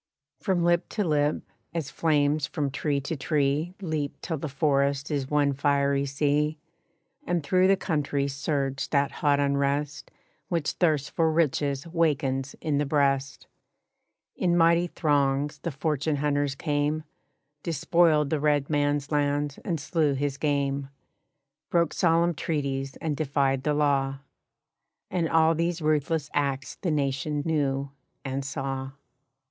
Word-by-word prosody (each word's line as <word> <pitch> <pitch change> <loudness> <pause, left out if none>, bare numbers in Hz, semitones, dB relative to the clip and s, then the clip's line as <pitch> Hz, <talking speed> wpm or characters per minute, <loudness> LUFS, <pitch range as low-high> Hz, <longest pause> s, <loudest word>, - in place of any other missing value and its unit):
From 180 -3 0
lip 175 0 +2
to 210 - -1
lip, 150 -3 +1 0.3
as 150 -5 -3
flames 150 -1 +1
from 145 -2 -2
tree 145 0 -1
to 140 +4 -3
tree 150 +4 0
Leap 155 -5 -3
till 160 -4 -3
the 155 - -4
forest 140 0 +1
is 140 -2 -1
one 145 -1 +2
fiery 140 0 +1
sea, 150 +2 +1 0.7
And 175 -3 0
through 185 +5 +3
the 195 0 +4
country 145 -5 -1
surged 140 -1 -2
that 140 -1 +2
hot 145 -1 +1
unrest 140 +1 0 0.4
Which 165 -4 -1
thirst 155 -5 +1
for 160 -1 +2
riches 145 -2 0
wakens 145 -5 0
in 145 -2 0
the 145 - +1
breast. 140 -1 0 0.9
In 175 -1 +1
mighty 170 +1 +4
throngs 145 -3 0
the 170 - -3
fortune 150 0 -1
hunters 145 -1 0
came, 150 +1 -1 0.6
Despoiled 165 -2 +2
the 155 - +1
red 145 -1 +1
man's 145 0 0
lands 145 -1 0
and 170 -4 -2
slew 150 -1 +1
his 140 0 -2
game, 140 -2 0 0.8
Broke 170 -1 +2
solemn 170 -1 +3
treaties 135 -4 -2
and 155 -2 -3
defied 140 -3 +1
the 150 +2 0
law. 140 -2 +1 0.9
And 170 -3 0
all 160 0 +4
these 170 +1 -1
ruthless 155 -1 0
acts 140 -3 -1
the 180 - -1
Nation 145 0 -1
knew 140 -3 0 0.3
and 135 +1 -2
saw. 135 -1 -4
145 Hz, 135 wpm, -27 LUFS, 140-160 Hz, 0.9 s, the